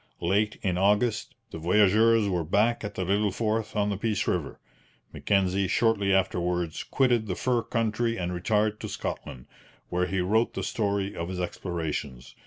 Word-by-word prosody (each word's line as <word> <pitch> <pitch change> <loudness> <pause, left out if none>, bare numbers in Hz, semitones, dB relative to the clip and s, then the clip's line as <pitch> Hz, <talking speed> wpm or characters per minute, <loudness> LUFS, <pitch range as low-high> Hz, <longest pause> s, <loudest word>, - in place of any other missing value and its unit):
Late 105 +5 +1
in 90 -3 0
August 105 +3 +1 0.2
the 80 - -6
voyageurs 105 +5 +4
were 90 -3 0
back 105 +9 +1
at 105 -1 -5
the 95 - -2
little 100 +3 +2
fort 110 +2 -2
on 105 0 +1
the 100 - -2
Peace 105 0 -1
river. 85 -6 -2 0.5
Mackenzie 95 -1 +1
shortly 100 -1 +2
afterwards 90 -3 0
quitted 120 -5 +1
the 90 - -2
fur 120 +3 +1
country 115 +1 -1
and 90 -2 -2
retired 105 +4 0
to - - -6
Scotland, 60 - -6 0.4
where 90 +1 0
he 95 - -1
wrote 110 +6 +1
the - - -3
story 100 -2 -1
of 85 +1 -4
his 95 -1 -4
explorations. 80 -8 -4
100 Hz, 165 wpm, -27 LUFS, 90-110 Hz, 0.5 s, voyageurs